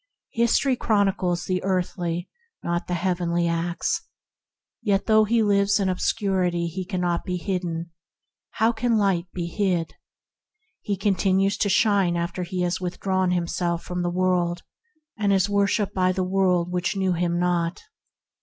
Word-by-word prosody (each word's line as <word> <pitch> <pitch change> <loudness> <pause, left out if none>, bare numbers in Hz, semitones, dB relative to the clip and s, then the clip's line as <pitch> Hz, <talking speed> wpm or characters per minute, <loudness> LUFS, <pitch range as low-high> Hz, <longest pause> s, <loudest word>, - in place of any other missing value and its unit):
History 235 +3 +2
chronicles 195 -6 +1
the 185 -1 -1
earthly, 175 -2 -1 0.4
not 175 +1 -2
the 180 - -1
heavenly 175 -1 0
acts. 170 +1 -1 0.8
Yet 205 -3 +1
though 215 -1 +5
he 225 +1 +2
lives 200 -1 +3
in 195 -1 +1
ob 185 - -2
scurity 185 -5 0
he 185 +3 -4
cannot 180 -2 -1
be 180 -1 -2
hidden— 175 -2 -3
for 165 0 -39
how 225 +2 +3
can 235 0 +1
light 190 -4 +1
be 175 -2 -4
hid?; 175 -3 -1 0.9
he 200 -1 -2
continues 195 0 +2
to 205 - +1
shine 195 -3 +3
after 170 +1 -3
he 180 +1 -3
has 175 +1 -1
withdrawn 185 +1 -1
himself 170 -1 -1
from 180 0 -4
the 175 - 0
world, 175 -1 0 0.6
and 205 -1 +2
is 195 0 +3
worshipped 200 0 +1
by 185 -1 +2
the 185 0 -1
world 180 -2 +1
that 180 +3 -1
knew 190 -2 +1
him 175 0 0
not. 175 -1 0
185 Hz, 155 wpm, -24 LUFS, 175-200 Hz, 0.9 s, though